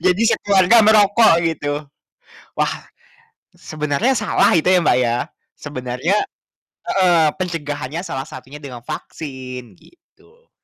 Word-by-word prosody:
Jadi 185 +4 +3
sekeluarga 200 +3 +4
merokok 215 -1 +5
gitu. 145 -3 -2 0.8
Wah, - - 0 0.9
sebenarnya 155 - -1
salah - - +2
itu 170 +1 +2
ya, 185 -1 +5
Mbak, 120 - +3
ya, 120 -1 +1 0.4
sebenarnya 130 +4 -3 0.7
heeh, 180 -4 +3 0.2
pencegahannya 150 -3 -4
salah 135 -6 -5
satunya 145 +3 -11
dengan 125 -4 -10
vaksin 130 -6 -8
gitu. 460 +6 -26
160 Hz, 105 wpm, -19 LUFS, 135-190 Hz, 0.9 s, merokok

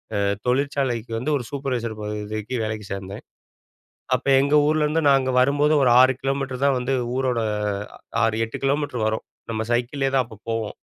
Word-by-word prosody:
அ - - +1 0.3
தொழிற்சாலைக்கு 125 -3 0
வந்து, 125 +7 -2
ஒரு 130 - -5
சூப்பர்வைசர் 125 -5 -3
பதவிக்கு 105 +2 -4
வேலைக்கு 110 -1 -4
சேந்தேன். 95 0 -6 0.9
அப்ப - - -5
எங்க 140 +2 +2
ஊர்லேருந்து 155 +1 +2
நாங்க 135 -1 +3
வரும்போது 145 +3 +3
ஒரு 125 - +4
6 130 +1 +6
கிலோமீட்டர் 135 -1 -2
தான் 140 -1 +3
வந்து 125 +2 -1 0.2
ஊரோட 130 -2 0 0.6
அ - - -29 0.2
6, 110 -1 +2
8 115 - -7
கிலோமீட்டர் 135 -4 0
வரும். 110 0 -2 0.3
நம்ம 110 -1 -2
சைக்கிள்லேயே 130 +3 0
தான் 130 -2 +3
அப்ப 110 -3 -14
போவோம். 115 -2 -2
125 Hz, 160 wpm, -23 LUFS, 110-140 Hz, 0.9 s, 6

